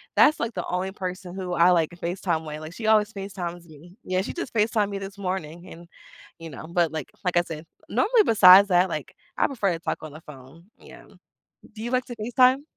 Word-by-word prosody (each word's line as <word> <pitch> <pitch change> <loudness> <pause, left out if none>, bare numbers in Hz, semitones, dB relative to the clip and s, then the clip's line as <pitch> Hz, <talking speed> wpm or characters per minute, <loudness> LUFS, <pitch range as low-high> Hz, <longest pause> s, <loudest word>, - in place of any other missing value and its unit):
that's, 305 - +5
like, 230 -1 -2
the 180 - -3
only 185 +1 -2
person 185 -1 -6
who 185 -2 -4
I, 170 +1 +5
like, 165 -2 +2
FaceTime 175 -1 -3
with, 150 0 -6
like, 155 +2 -9
she 220 -2 -5
always 215 0 +3
FaceTimes 180 -4 -6
me. 165 +3 -16
Yeah, 185 0 -1
she - - -5
just 345 -9 -6
FaceTime'd 215 -1 +1
me 200 - -4
this 195 +1 -8
morning 180 -3 -5
and, 170 +1 -12 0.5
you 165 0 -8
know. 145 +1 -9
But, 170 -2 +1
like 155 -3 -4 0.2
like 180 -1 0
I - - +6
said, 165 -2 -8 0.2
normally, 440 +1 +3
besides 200 -2 +8
that, 180 0 +4
like, 155 -4 -5 0.2
I - - +3
prefer 205 -9 -1
to 165 - -5
talk - - -3
on 155 -2 -8
the 155 - -11
phone, 145 +3 -14
yeah. - - -14 0.7
Do 215 - -10
you 240 - -3
like 255 -1 +1
to 240 - -7
FaceTime? 255 +5 +3
180 Hz, 220 wpm, -25 LUFS, 170-210 Hz, 0.7 s, besides